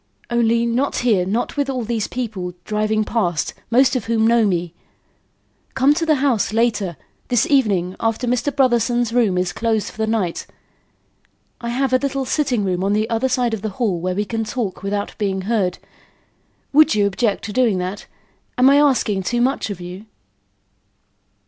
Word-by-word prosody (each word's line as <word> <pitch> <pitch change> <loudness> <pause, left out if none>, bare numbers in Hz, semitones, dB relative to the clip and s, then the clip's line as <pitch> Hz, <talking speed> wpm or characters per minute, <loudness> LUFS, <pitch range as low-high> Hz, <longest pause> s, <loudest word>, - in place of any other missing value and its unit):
Only, 235 0 +2
not 245 +4 0
here, 195 -7 +2
not 220 +5 -1
with 285 -1 -1
all 255 -3 -2
these 225 -1 -2
people 205 -8 -5
driving 215 0 0
past; 180 -8 -1 0.2
most 255 +4 +4
of 245 - -2
whom 225 -1 +1
know 230 -1 +4
me. 175 -3 -1 1.0
Come 270 +2 +4
to 330 +1 -2
the 310 - +4
house 265 -8 +1
later 215 -6 0 0.3
this 245 -2 +2
evening, 195 -10 +2
after 225 +2 -1
Mr. 250 +4 0
Brotherson's 240 -3 +1
room 220 -7 +2
is 180 0 -1
closed 225 -2 -1
for - - -19
the 220 - 0
night. 210 -6 -1 1.1
I 235 - -4
have 260 +2 0
a 255 - +4
little 275 -1 -2
sitting 260 -5 0
room 185 -1 -1
on 200 +1 +1
the 215 +1 +1
other 230 +3 +1
side 250 -2 0
of 220 - -3
the 215 - -2
hall 205 -8 0
where 180 +2 -2
we 205 +2 -1
can 225 +1 -2
talk 215 -3 -4
without 200 +1 -3
being 195 -2 -1
heard. 195 -3 0 1.0
Would 310 -1 +5
you 205 -1 +3
object 200 +1 0
to 210 - -6
doing 235 -6 +2
that? 185 +3 -5 0.5
Am 255 +2 +6
I 280 - +5
asking 255 -9 +2
too 240 +6 -1
much 255 -1 0
of 200 -3 -5
you?" 180 +4 -9
225 Hz, 180 wpm, -20 LUFS, 200-250 Hz, 1.1 s, Am